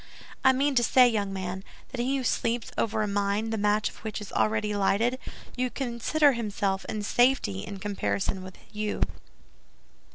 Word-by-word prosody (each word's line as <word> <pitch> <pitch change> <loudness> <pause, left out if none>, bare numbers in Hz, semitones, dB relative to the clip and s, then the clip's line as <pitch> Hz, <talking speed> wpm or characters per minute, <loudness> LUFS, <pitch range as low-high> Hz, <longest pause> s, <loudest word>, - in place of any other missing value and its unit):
"I 265 - +7
mean 275 +2 +1
to 240 -2 +3
say, 250 +1 +6
young 205 -4 0
man, 190 0 -4 0.3
that 260 - -7
he 265 +3 +1
who 265 - -3
sleeps 230 -1 -1
over 220 -1 0
a - - -1
mine 205 +2 0
the - - 0
match 210 +1 +2
of - - -8
which 220 -1 -5
is 210 - -9
already 210 -1 +1
lighted, 220 +6 +1 0.4
may 255 0 0
consider 270 +4 +2
himself 200 -4 -2
in 210 -1 -4
safety 240 - +2
in 195 - -6
comparison 195 -1 -2
with 185 0 -10 0.2
you." 210 0 -1
215 Hz, 170 wpm, -27 LUFS, 200-245 Hz, 0.4 s, I